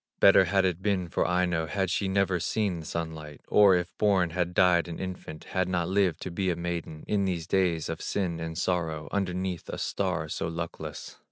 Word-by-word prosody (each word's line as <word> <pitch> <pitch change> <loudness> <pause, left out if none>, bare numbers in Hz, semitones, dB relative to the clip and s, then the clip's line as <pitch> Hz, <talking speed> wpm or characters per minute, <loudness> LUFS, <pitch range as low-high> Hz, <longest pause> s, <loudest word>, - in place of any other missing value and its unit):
Better 95 -1 +7
had 95 +2 +2
it 90 -1 -1
been 95 -4 0
for - - 0
Aino 90 -2 +1
Had 95 +1 -1
she 100 - 0
never 95 -2 +1
seen 95 +1 -1
the 80 - -8
sunlight, 80 -3 -5
Or 100 -3 +6
if 90 0 -2
born 95 -5 +3
had 90 0 -2
died 90 -1 +4
an 85 - -6
infant, 90 -4 -6
Had 95 -1 -1
not 90 -2 0
lived 95 -4 +1
to 95 - -5
be 95 +2 -1
a 90 - +1
maiden 85 -2 -4
In 100 -2 +1
these 85 -4 -2
days 85 -3 +1
of - - -4
sin 90 -4 -2
and 80 0 -5
sorrow, 80 -3 -1
Underneath 90 -2 -2
a - - -4
star 90 -5 -1
so 75 - -3
luckless. 80 0 -6
90 Hz, 200 wpm, -28 LUFS, 85-95 Hz, -, Better